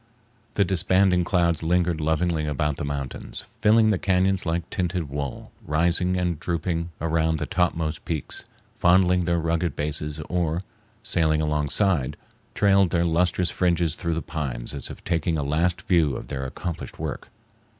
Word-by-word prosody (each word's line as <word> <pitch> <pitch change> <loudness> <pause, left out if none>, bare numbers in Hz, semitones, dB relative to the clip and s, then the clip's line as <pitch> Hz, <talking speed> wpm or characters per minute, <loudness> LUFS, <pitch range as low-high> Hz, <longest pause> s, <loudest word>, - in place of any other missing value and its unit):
The 100 - +3
disbanding 95 0 +3
clouds 85 -2 +2
lingered 85 -1 +1
lovingly 80 0 0
about 75 0 -1
the - - -4
mountains, 70 -2 -5
filling 110 0 +5
the 95 - 0
cañons 95 -1 +1
like 85 +1 -1
tinted 90 -4 -2
wool, 70 -2 -5
rising 85 +4 +1
and 90 -3 -1
drooping 85 0 -2
around 80 0 +1
the - - -2
topmost 80 -3 -1
peaks, 80 -4 -4 0.4
fondling 90 0 +4
their 85 0 +1
rugged 85 -1 0
bases, 75 +1 -2
or, 85 +1 -1 0.4
sailing 80 -3 +1
alongside, 75 0 +1 0.4
trailed 100 -2 +4
their 85 0 +1
lustrous 85 +1 +1
fringes 85 -3 +1
through 85 -2 -2
the 80 - -3
pines 65 -7 -4
as 70 -3 -2
if - - -10
taking 85 -1 0
a 75 - -1
last 80 +5 0
view 80 -6 +2
of - - -7
their 65 0 -3
accomplished 85 +5 -6
work. - - -5
85 Hz, 150 wpm, -25 LUFS, 75-90 Hz, 0.4 s, filling